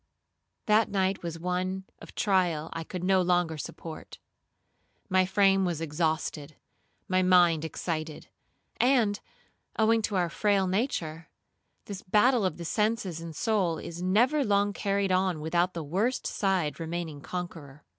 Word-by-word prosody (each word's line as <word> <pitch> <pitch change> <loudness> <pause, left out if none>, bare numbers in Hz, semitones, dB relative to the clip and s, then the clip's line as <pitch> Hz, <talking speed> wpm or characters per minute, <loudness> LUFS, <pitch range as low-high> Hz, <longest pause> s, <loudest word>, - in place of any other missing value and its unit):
That 215 0 +3
night 190 -1 0
was 170 -1 -5
one 180 +2 -2 0.2
of - - -13
trial 175 -6 +1
I 165 - -4
could 180 +2 -6
no 190 0 +3
longer 175 -2 +1
support. 155 +2 -8 0.9
My 185 -1 +3
frame 195 0 +3
was 175 -4 -1
exhausted, 155 -1 -2 0.5
my 185 0 +2
mind 175 -3 +4
excited, 155 -1 -4 0.5
and, 240 -5 +3 0.6
owing 225 +1 +3
to 210 -1 -2
our 175 -2 +1
frail 200 -2 +2
nature, 175 - -2 0.6
this 200 -1 -7
battle 215 +3 +3
of 180 -4 -1
the 170 - -7
senses 210 -4 -1
and 165 -2 -8
soul 190 -4 0
is 170 +1 -7
never 240 +11 +3
long 205 -2 +2
carried 200 -1 0
on 185 -3 +1
without 175 +4 0
the 165 - -3
worst 200 - -1
side 185 -7 0
remaining 165 -3 -4
conqueror. 155 -5 -7
185 Hz, 140 wpm, -28 LUFS, 165-200 Hz, 0.9 s, mind